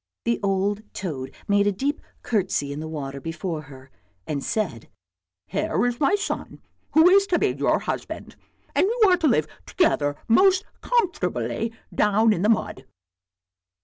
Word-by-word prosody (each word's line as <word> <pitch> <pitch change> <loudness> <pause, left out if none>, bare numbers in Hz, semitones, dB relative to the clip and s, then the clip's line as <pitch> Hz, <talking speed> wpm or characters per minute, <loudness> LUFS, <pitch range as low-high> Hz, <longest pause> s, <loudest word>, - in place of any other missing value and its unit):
The 235 0 +1
old 200 +1 0
toad 145 -9 -4 0.2
made 205 0 +3
a - - +3
deep 275 +9 -2 0.2
curtsey 185 -10 0
in 145 - -6
the 160 - -5
water 140 -3 -5
before 165 +1 -4
her, 135 -2 -14 0.3
and 145 -3 -3
said, 175 - -2 0.3
" 90 0 -66
Here 185 - 0
is 245 -1 -1
my 305 +7 +3
son, 410 +1 -4 0.3
who 320 +2 +7
is 395 +2 +5
to 355 - +2
be - - +2
your - - +1
husband, - - -5 0.4
and - - +3
you 445 -2 +4
are 360 - +5
to 335 -3 +1
live 155 - +3 0.2
together 145 - +1
most 375 - +4 0.2
comfortably 375 - 0 0.2
down 215 +2 +3
in 170 - -2
the 210 - +2
mud." 135 - 0
200 Hz, 160 wpm, -24 LUFS, -, 0.4 s, who